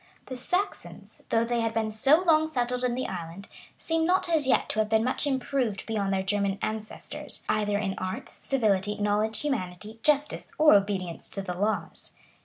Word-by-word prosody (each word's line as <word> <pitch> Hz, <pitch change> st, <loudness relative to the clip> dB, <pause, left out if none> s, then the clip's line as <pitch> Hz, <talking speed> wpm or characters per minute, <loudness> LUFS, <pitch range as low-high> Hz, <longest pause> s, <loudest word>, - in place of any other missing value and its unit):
] -, -, -34 dB
The -, -, -2 dB
Saxons, 360 Hz, +11 st, -4 dB
though 225 Hz, -, +3 dB
they 240 Hz, 0 st, 0 dB
had 225 Hz, -1 st, -1 dB
been 220 Hz, -1 st, 0 dB
so 275 Hz, +11 st, +4 dB
long 315 Hz, -2 st, +4 dB
settled 250 Hz, -4 st, -1 dB
in 245 Hz, -1 st, +1 dB
the 255 Hz, -, -2 dB
island, 175 Hz, +2 st, -6 dB, 0.3 s
seem 325 Hz, 0 st, 0 dB
not 360 Hz, +3 st, +2 dB
as 315 Hz, -5 st, +2 dB
yet 265 Hz, -, +3 dB
to 215 Hz, -, -1 dB
have 215 Hz, -1 st, +1 dB
been 220 Hz, 0 st, +3 dB
much 255 Hz, +4 st, 0 dB
improved 260 Hz, -6 st, -1 dB
beyond 205 Hz, -3 st, -1 dB
their 190 Hz, -1 st, 0 dB
German 200 Hz, 0 st, 0 dB
ancestors, 215 Hz, 0 st, -5 dB
either 210 Hz, -1 st, +1 dB
hi 195 Hz, -2 st, -1 dB
arts, 185 Hz, 0 st, -4 dB
civility, 210 Hz, -6 st, 0 dB
knowledge, 210 Hz, +1 st, 0 dB
humanity, 215 Hz, -5 st, -3 dB
justice, 295 Hz, +2 st, +1 dB
or 305 Hz, 0 st, +7 dB
obedience 195 Hz, -4 st, 0 dB
to 195 Hz, -, -5 dB
the 180 Hz, -2 st, -3 dB
laws. 205 Hz, +4 st, -2 dB
220 Hz, 185 wpm, -27 LUFS, 200-265 Hz, 0.3 s, or